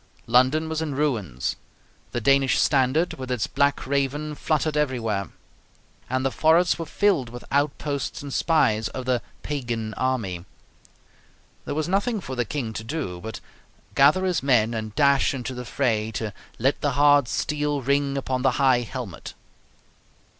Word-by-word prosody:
London 130 +7 +3
was 160 0 -2
in 150 -4 -3
ruins; 105 - -1 0.5
the 120 - -1
Danish 135 +2 +3
standard, 140 +5 +2
with 130 -1 -6
its 125 -4 0
black 140 0 +1
Raven, 140 +2 -1
fluttered 155 0 0
everywhere; 115 -9 -1 0.8
and 130 +1 0
the 135 - +1
forests 165 +4 +3
were 165 - -4
filled 185 - +1
with 120 +1 -9
outposts 140 0 -1
and 140 -2 -6
spies 110 -10 +2
of 130 -1 -6
the 125 -2 +1 0.2
"pagan 120 -6 -3
army." 110 -10 -2 1.2
There - - -3
was 155 +1 -1
nothing 205 +5 0
for 130 -8 -6
the 120 -1 0
King 120 -2 -4
to 110 - -5
do 115 - -4
but 110 +3 -7 0.5
gather 150 +7 +5
his 180 -4 +1
men 120 -4 +3
and 110 -2 -5
dash 140 +1 +3
into 130 0 -4
the 125 0 -6
fray 110 -5 0
to 110 -3 -3 0.2
"let 135 +5 +1
the 145 -2 +1
hard 145 -1 +5
steel 145 +1 -1
ring 140 +1 +1
upon 130 -1 -2
the 135 - +3
high 130 -3 +4
helmet." 120 -6 -7
135 Hz, 155 wpm, -24 LUFS, 120-145 Hz, 1.2 s, gather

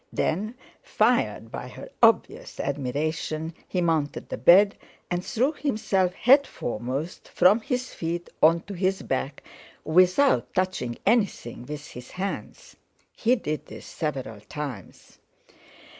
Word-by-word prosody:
Then, 210 +8 -1 0.3
fired 115 - +1
by - - -6
her - - -10
obvious - - +2
admiration, 155 +4 -2
he 180 - -1
mounted 160 -4 -1
the - - -4
bed, 200 +4 +6 0.4
and 175 0 -1
threw 260 +7 +1
himself 210 - 0
head 270 +4 +5
foremost 130 +8 -4
from 205 +5 +4
his 250 +2 -3
feet 170 +1 -3
on 165 +2 +5
to 205 - -9
his 190 +1 0
back, 135 +2 -3 0.4
without 185 - +3
touching 185 -11 -1
anything 200 - 0
with 150 0 -6
his 125 0 -10
hands. 200 - -6 0.4
He 245 +2 +3
did 155 -10 -4
this - - -10
several 135 -9 -4
times. 130 - -8
175 Hz, 125 wpm, -26 LUFS, 145-210 Hz, 0.4 s, bed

